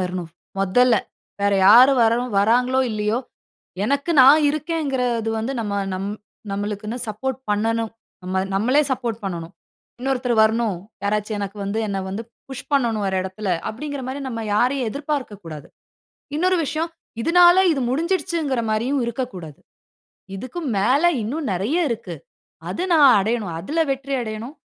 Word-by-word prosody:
வரணும் 180 -2 -3 0.3
மொதல்ல. 230 +5 +4 0.4
வேற 200 0 +2 0.2
யாரும் 255 +2 +8
வர 230 +1 +3 0.2
வராங்களோ 250 +5 +3
இல்லையோ 215 +2 0 0.7
எனக்கு 280 +7 0
நான் 285 +4 +8
இருக்கேங்கறது 270 -7 -1
வந்து 230 +5 -2
நம்ம 205 -3 -3 0.2
நம் 195 +2 -3 0.4
நம்மளுக்குன்னு 210 +3 -3
சப்போர்ட் 260 +5 -3
பண்ணணும். 225 +2 0 0.3
நம்ம 185 +1 -1
நம்மளே 255 +9 +3
சப்போர்ட் 235 -4 -2
பண்ணணும். 170 -2 -5 0.5
இன்னொருத்தரு 250 -2 0
வரணும், 220 -2 +1 0.3
யாராச்சு 210 +1 -1
எனக்கு 200 +1 -5
வந்து 200 +3 -2
என்ன 195 -1 -2
வந்து 210 +4 -4 0.2
புஷ் 265 -2 -8
பண்ணணும் 230 -7 +1
ஒரு 190 - -1
இடத்தில 190 +2 -5 0.2
அப்படிங்கற 285 +4 -5
மாரி 270 +2 -4
நம்ம 230 -3 -4
யாரையும் 250 +1 +1
எதிர்பார்க்க 280 -6 -3
கூடாது. 155 -3 -8 0.7
இன்னொரு 365 +2 +2
விஷயம் 315 +4 -2 0.3
இதனால 350 +1 +6 0.2
இது 270 - -2
முடிஞ்சிடுச்சிங்கற 325 -4 -1
மாரியும் 255 +6 0
இருக்கக்கூடாது. 225 - -5 0.8
இதுக்கு 255 - -6 0.2
மேல 255 - +2 0.2
இன்னும் 280 +3 -3
நிறைய 270 - 0
இருக்கு. 230 -2 -4 0.5
அது 355 - -3
நான் 290 -4 +7
அடையனும் 210 -3 -1
அதில 300 - -3
வெற்றி 275 +1 -4
அடையனும். 225 +6 -6
235 Hz, 135 wpm, -22 LUFS, 210-275 Hz, 0.8 s, யாரும்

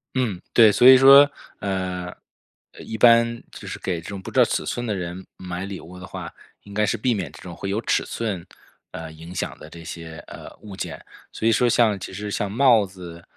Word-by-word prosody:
嗯， 110 -9 -1
对。 115 -2 +7
所 120 +5 +5
以 130 - +10
说， 140 +2 +8 0.3
呃， 90 -2 -3 0.7
一 110 - -7
般 115 0 +4
就 - - -11
是 - - -6
给 90 -3 -3
这 85 - -10
种 100 -2 -6
不 - - -8
知 - - 0
道 - - +8
尺 - - -2
寸 120 - -3
的 110 - -1
人 90 0 -6
买 90 0 -6
礼 100 -1 -7
物 90 +2 -12
的 90 - -9
话， - - -8 0.3
应 100 - -13
该 105 +1 +1
是 105 - -1
避 125 +3 +1
免 90 -10 -4
这 - - -14
种 85 -2 -9
会 100 - -5
有 100 +2 -1
尺 - - 0
寸， 100 -7 -4 0.5
呃， 80 -1 -7
影 80 +2 -11
响 90 - -4
的 75 - -12
这 85 +1 -12
些， 80 -1 -8
呃， - - -11
物 105 -3 -10
件。 - - -6 0.3
所 110 - -2
以 - - +5
说 120 +2 +3
像 110 -3 +3
其 95 - -8
实 105 +2 -6
像 100 -1 -2
帽 120 -2 +4
子， 90 -3 -11
100 Hz, 240 characters per minute, -23 LUFS, 90-115 Hz, 0.7 s, 以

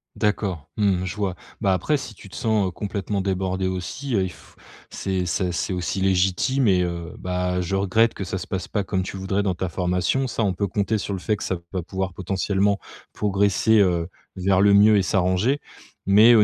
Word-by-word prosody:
D'accord, 95 -7 -1
mmh, 95 -3 +2
je 90 - -4
vois, 100 -4 -1 0.3
bah 95 - +3
après, 95 +11 +1
si 120 -6 -5
tu 100 - -13
te - - -11
sens, 110 -3 +1
heu, - - -3
complètement 100 +1 -3
débordé 95 -1 -1
aussi, 95 +10 -4
il 95 -4 +1
f - - -18 0.3
c'est 95 -2 -2
c'est 90 +1 0
c'est 85 - -2
aussi 90 +1 -2
légitime 95 +7 +2
et 90 -2 +4
heu, 85 -1 -4
bah 90 0 -1
je 90 +2 -2
regrette 100 +4 +2
que - - -4
ça 95 0 -3
se - - -7
passe 95 -2 -3
pas 105 - -1
comme 95 -1 -1
tu 95 - -6
voudrais 95 +1 -1
dans 95 -3 +1
ta 90 +1 -3
formation. 90 +9 0
Ça 115 -1 -1
on 95 -3 +1
peut 100 +2 -1
compter 105 +2 0
sur 100 - -3
le 95 - -3
fait 105 +3 0
que - - -6
ça 95 - -1 0.2
va 90 -2 -2
pouvoir 95 +2 -3
potentiellement 95 +2 0 0.3
progresser, 100 +2 +2
heu, 85 -2 +1 0.3
vers 95 0 +2
le 100 0 +6
mieux 105 +1 +7
et 95 - +3
s'arranger. 95 +9 +1 0.5
Mais 105 +4 +7
au 110 -2 +7
95 Hz, 210 wpm, -23 LUFS, 90-105 Hz, 0.5 s, mieux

